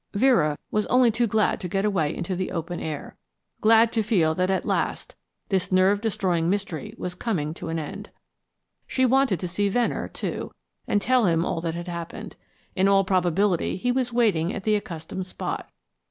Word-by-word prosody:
Vera 195 Hz, -, +3 dB
was 210 Hz, 0 st, 0 dB
only 250 Hz, -2 st, +4 dB
too 235 Hz, +2 st, +1 dB
glad 215 Hz, 0 st, +1 dB
to 180 Hz, -, -3 dB
get 195 Hz, +3 st, -1 dB
away 170 Hz, -8 st, +1 dB
into 180 Hz, +2 st, -3 dB
the 185 Hz, +1 st, -2 dB
open 170 Hz, 0 st, -4 dB
air, 155 Hz, -2 st, -6 dB, 0.4 s
glad 225 Hz, +1 st, +5 dB
to 225 Hz, -, +2 dB
feel 185 Hz, -7 st, +2 dB
that 185 Hz, +3 st, 0 dB
at 190 Hz, -1 st, 0 dB
last -, -, -1 dB, 0.4 s
this 190 Hz, -3 st, 0 dB
nerve 190 Hz, +2 st, +4 dB
destroying 180 Hz, -6 st, 0 dB
mystery 190 Hz, -6 st, -3 dB
was 180 Hz, -, -4 dB
coming 175 Hz, -7 st, -2 dB
to 165 Hz, -, -7 dB
an 165 Hz, -, -2 dB
end. 195 Hz, +7 st, -6 dB, 0.8 s
She 260 Hz, -, +1 dB
wanted 260 Hz, -6 st, +3 dB
to 180 Hz, -, -2 dB
see 200 Hz, +3 st, 0 dB
Venner, 240 Hz, +3 st, 0 dB
too, -, -, -5 dB, 0.3 s
and 205 Hz, -, +1 dB
tell 255 Hz, -3 st, +3 dB
him 165 Hz, 0 st, +2 dB
all 165 Hz, -, -2 dB
that 165 Hz, -1 st, -3 dB
had 175 Hz, +1 st, -6 dB
happened. 170 Hz, -1 st, -6 dB, 0.4 s
In 190 Hz, 0 st, +3 dB
all 195 Hz, 0 st, +5 dB
probability 185 Hz, 0 st, +1 dB
he 245 Hz, +6 st, 0 dB
was 250 Hz, -1 st, 0 dB
waiting 200 Hz, -8 st, +2 dB
at 200 Hz, -, -5 dB
the 215 Hz, -, +2 dB
accustomed 180 Hz, -1 st, -5 dB
spot. -, -, -5 dB
190 Hz, 185 wpm, -25 LUFS, 170-215 Hz, 0.8 s, glad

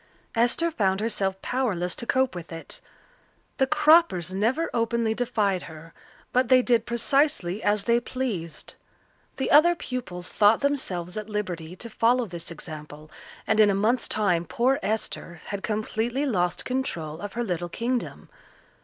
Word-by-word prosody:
Esther 245 Hz, +9 st, +2 dB
found 195 Hz, -9 st, +1 dB
herself 195 Hz, -3 st, -1 dB
powerless 195 Hz, -9 st, -1 dB
to 235 Hz, -, -6 dB
cope 260 Hz, 0 st, +2 dB
with 175 Hz, -2 st, -8 dB
it. 165 Hz, 0 st, -6 dB, 0.8 s
The 265 Hz, -, +3 dB
Croppers 305 Hz, -, +4 dB
never 235 Hz, +12 st, +1 dB
openly 230 Hz, -1 st, +1 dB
defied 215 Hz, -6 st, 0 dB
her, 160 Hz, 0 st, -12 dB, 0.4 s
but 255 Hz, 0 st, +3 dB
they 255 Hz, 0 st, +5 dB
did 235 Hz, -2 st, +2 dB
precisely 235 Hz, -, +1 dB
as 205 Hz, -1 st, +1 dB
they 235 Hz, +3 st, +3 dB
pleased. 225 Hz, -11 st, -4 dB, 0.6 s
The 265 Hz, -, -1 dB
other 340 Hz, +4 st, +7 dB
pupils 190 Hz, -, -5 dB
thought 210 Hz, +1 st, +4 dB
themselves 195 Hz, -11 st, -1 dB
at 215 Hz, 0 st, -5 dB
liberty 180 Hz, -5 st, -4 dB
to 235 Hz, -, -6 dB
follow 235 Hz, +2 st, +2 dB
this 170 Hz, -4 st, -7 dB
example, 155 Hz, -2 st, -9 dB, 0.3 s
and 220 Hz, -, +1 dB
in 210 Hz, -1 st, +7 dB
a 195 Hz, -, +2 dB
month's 225 Hz, +5 st, +1 dB
time 185 Hz, -6 st, +1 dB
poor 255 Hz, -, +1 dB
Esther 200 Hz, -5 st, -3 dB
had 200 Hz, -1 st, -4 dB
completely 225 Hz, +5 st, -1 dB
lost 180 Hz, -9 st, 0 dB
control 170 Hz, -, -3 dB
of 205 Hz, -1 st, -6 dB
her 240 Hz, -, -2 dB
little 175 Hz, -5 st, -3 dB
kingdom. 240 Hz, +6 st, -3 dB
215 Hz, 150 wpm, -26 LUFS, 180-250 Hz, 0.8 s, other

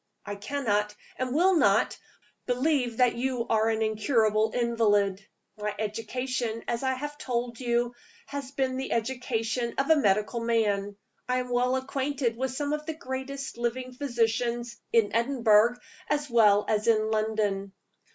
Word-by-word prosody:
I 205 Hz, -, -4 dB
cannot, 210 Hz, -2 st, -1 dB, 0.2 s
and 255 Hz, -1 st, -2 dB
will 370 Hz, +4 st, +5 dB
not, -, -, +3 dB, 0.5 s
believe 250 Hz, -2 st, +1 dB
that 250 Hz, -2 st, +4 dB
you 250 Hz, -1 st, -1 dB
are 220 Hz, 0 st, +3 dB
an 220 Hz, 0 st, +1 dB
incurable 220 Hz, 0 st, +2 dB
invalid. 210 Hz, -5 st, +1 dB, 0.4 s
My 210 Hz, 0 st, -2 dB
education, 230 Hz, +2 st, -3 dB
as 235 Hz, -1 st, -1 dB
I 260 Hz, -1 st, 0 dB
have 295 Hz, +2 st, -6 dB
told 240 Hz, -2 st, -3 dB
you, 240 Hz, -1 st, 0 dB, 0.3 s
has 280 Hz, -2 st, -6 dB
been 265 Hz, -2 st, -1 dB
the 265 Hz, -, -2 dB
education 235 Hz, 0 st, -2 dB
of 275 Hz, +3 st, +2 dB
a -, -, +8 dB
medical 210 Hz, -3 st, +1 dB
man. 210 Hz, -3 st, 0 dB, 0.3 s
I 250 Hz, -, +2 dB
am 250 Hz, 0 st, -2 dB
well 250 Hz, +1 st, +2 dB
acquainted 265 Hz, -2 st, -1 dB
with 260 Hz, +3 st, -2 dB
some 285 Hz, +3 st, -2 dB
of 300 Hz, +1 st, -4 dB
the 320 Hz, -, -3 dB
greatest 275 Hz, -3 st, -5 dB
living 250 Hz, +2 st, -2 dB
physicians, 240 Hz, -2 st, -1 dB, 0.2 s
in 225 Hz, -2 st, +3 dB
Edinburgh 235 Hz, -2 st, +4 dB, 0.3 s
as 295 Hz, -2 st, -1 dB
well 210 Hz, -3 st, +5 dB
as 215 Hz, +1 st, 0 dB
in 220 Hz, -1 st, +3 dB
London. 215 Hz, -3 st, 0 dB
235 Hz, 150 wpm, -28 LUFS, 220-260 Hz, 0.5 s, a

